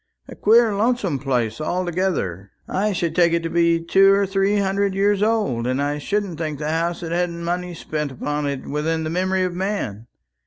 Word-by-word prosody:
A - - -9
queer 225 +1 +4
lonesome 205 - 0
place 125 -2 -1
altogether. 175 - -2 0.2
I 205 +3 0
should 170 -4 -2
take 170 -2 +4
it 170 0 +1
to 165 - -3
be 170 -1 +3
two 195 +4 +4
or 200 0 +3
three 195 +1 +1
hundred 200 0 0
years 200 +1 +2
old; 210 - +1
and 130 +1 0
I 145 +1 -1
shouldn't 200 0 -2
think 155 -3 -3
the 150 +1 -2
house 170 +1 -1
had 165 -1 -5
had 175 +1 +1
money 175 +1 -4
spent 150 -2 -4
upon 145 +3 -3
it 140 -2 -4
within 160 +2 -1
the 155 - -3
memory 185 +2 0
of 180 -1 -1
man. 175 - -3
170 Hz, 195 wpm, -22 LUFS, 150-195 Hz, 0.2 s, queer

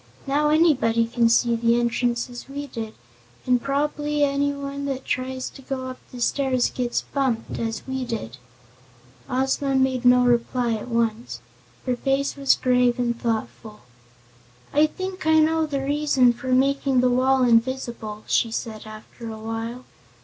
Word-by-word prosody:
Now 290 +2 +1
anybody 270 -8 +3
can 230 0 +2
see 235 0 +3
the 230 +1 +2
entrance, 240 0 0
as 245 +1 -10
we 285 +1 -5
did. 225 -5 -7 0.5
And 250 -1 +2
prob'bly 295 +2 -1
anybody 280 0 -1
that 270 -1 -4
tries 255 0 -2
to 270 - -13
go 260 0 -4
up 255 - -8
the 250 - -9
stairs 255 0 +1
gets 245 -1 -2
bumped, 260 -5 -1
as 225 -1 -3
we 265 -1 -3
did." 180 - -5 0.9
Ozma 270 +1 0
made 260 -1 +1
no 250 0 +6
reply 240 0 +1
at 220 +2 -4
once. 230 -1 -1 0.5
Her 250 -1 0
face 275 +3 0
was 275 -1 +3
grave 250 -1 +2
and 240 -1 -1
thoughtful. 220 -1 -4 0.9
"I 300 +2 +5
think 375 0 -6
I 315 0 +5
know 320 0 +3
the 280 -2 -2
reason 280 -4 +3
for 245 +2 -9
making 270 0 +2
the 250 0 +3
wall 260 +1 +3
invisible," 235 -3 0
she 230 - +2
said 220 -1 -5
after 215 +2 -10
a 220 - -7
while. 225 +3 -5
255 Hz, 155 wpm, -23 LUFS, 235-275 Hz, 0.9 s, no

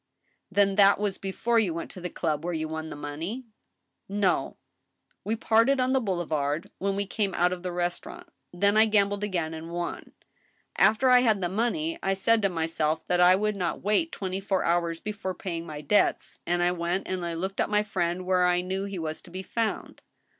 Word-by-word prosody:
" - - -44
Then 200 0 +2
that 200 -1 +6
was 205 -2 -2
before 230 +4 0
you 185 -7 0
went 165 - -5
to 185 - -9
the 180 - -4
club 155 -3 -2
where 175 0 -2
you 160 0 -2
won 160 0 -5
the - - -7
money? 160 - -5 0.2
" - - -52
" - - -52 0.2
No.... 180 - 0 0.7
We 220 - -1
parted 230 +4 +3
on 255 +1 +2
the 265 - +4
boulevard 160 - -2
when 195 0 -1
we 200 0 -1
came 200 -1 -2
out 180 +1 +2
of 180 - -6
the 180 0 -4
restaurant.... 175 - -4 0.2
Then 200 +4 +2
I 220 +1 +6
gambled 205 -1 +2
again 175 -6 -2
and 160 +1 -7
won. 175 0 -5 0.6
After 240 +5 +4
I 250 - +8
had 220 -5 +3
the 175 -2 -1
money 305 - -1
I 195 - 0
said 225 +3 +3
to 200 - +2
myself 160 -2 -1
that 180 0 +3
I 180 +1 +7
would 210 +2 0
not 180 -4 -3
wait 215 - +1
twenty 190 -1 -4
four, 195 -1 0
hours 170 -1 0
before 205 -2 -4
paying 170 -3 -5
my 150 -1 -6
debts, 180 +8 +1
and 175 0 +1
I 175 - +3
went 175 +2 -2
and 185 -1 -2 0.2
looked 190 +2 -2
up - - 0
my 210 0 +2
friend 180 -3 -2
where 180 -1 +3
I 180 0 +2
knew 190 +2 -3
he 200 -1 -5
was 160 -2 -4
to - - -15
be 185 +2 -6
found." 225 +3 -3
185 Hz, 215 wpm, -27 LUFS, 170-210 Hz, 0.7 s, I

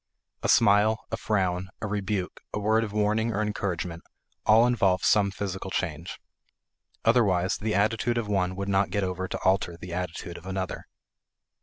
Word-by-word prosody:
A - - -1
smile, 105 +2 +4
a - - 0
frown, 95 -3 -1
a 105 - -4
rebuke, 100 -2 -3
a - - -1
word 110 +2 +2
of 105 - -4
warning 105 +2 +1
or 110 0 0
encouragement, 90 -5 -3 0.5
all 110 +2 +7
involve 100 -7 +2
some 105 -2 +4
physical 95 -1 -5
change. 85 -3 -3 0.9
Otherwise, 100 -6 +3
the 110 0 -1
attitude 115 +4 +1
of 115 -3 -1
one 95 -3 0
would 100 +1 -4
not 100 -1 +2
get 100 +2 -1
over 90 0 -2
to - - -4
alter 95 -2 +2
the 85 0 -8
attitude 90 -1 -5
of 90 - -13
another. 95 0 -4
100 Hz, 165 wpm, -27 LUFS, 90-105 Hz, 0.9 s, all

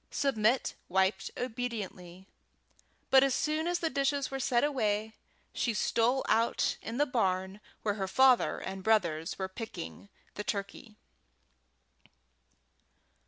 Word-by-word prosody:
Submit 250 -2 +1 0.2
wiped 190 +1 +1
obediently, 210 -7 -5 0.9
but 265 0 +8
as 275 -2 +2
soon 310 +2 0
as 350 0 +1
the 330 -2 -1
dishes 275 0 0
were 270 - -3
set 245 -2 +2
away, 220 -6 0 0.4
she 235 -3 -1
stole 240 +5 +1
out 230 +1 +2
in 230 +2 -5
the 290 - +3
barn 190 -6 -1 0.2
where 210 - +1
her 190 - 0
father 260 +5 +4
and 190 0 -6
brothers 175 -7 +1
were 190 - -2
picking 200 -1 -8 0.2
the 210 - -5
turkey. 205 +2 -5
225 Hz, 120 wpm, -31 LUFS, 190-265 Hz, 0.9 s, but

